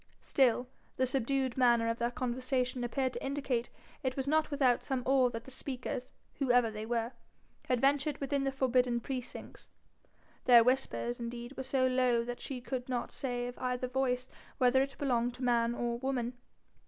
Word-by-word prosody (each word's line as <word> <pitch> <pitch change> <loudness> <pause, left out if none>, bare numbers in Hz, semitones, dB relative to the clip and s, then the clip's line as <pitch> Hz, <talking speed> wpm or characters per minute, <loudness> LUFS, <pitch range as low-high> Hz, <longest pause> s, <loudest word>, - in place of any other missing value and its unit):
Still 250 -2 +3 0.3
the 260 - +3
subdued 265 0 0
manner 240 -3 +4
of 230 0 -1
their 235 0 +1
conversation 255 0 -1
appeared 260 +1 -1
to - - -5
indicate 270 -4 -1 0.3
it 260 0 -2
was 265 - -1
not 310 +2 +2
without 270 -5 +2
some 265 -2 -2
awe 260 -1 +4
that 230 -1 -6
the 265 - -12
speakers, 255 -1 -5 0.3
whoever 245 -4 +3
they 215 0 -6
were, 230 0 -1 0.6
had 250 -1 +2
ventured 280 +2 +2
within 280 0 -1
the 270 - 0
forbidden 255 -2 +2
precincts; 250 0 -6 0.8
their 240 -2 +8
whispers, 250 -1 0
indeed, 240 +2 -6
were - - -4
so 265 0 +1
low 255 -2 +3
that 240 +1 -6
she 265 -2 -5
could 255 0 -4
not 245 -2 -2
say 245 -2 -3
of 245 0 -7
either 250 0 -1
voice 255 0 0 0.3
whether 255 +1 +4
it 270 0 -3
belonged 245 -3 0
to 255 - -7
man 235 -1 +2
or 235 -1 -2
woman. 250 -2 -1
250 Hz, 175 wpm, -32 LUFS, 240-265 Hz, 0.8 s, their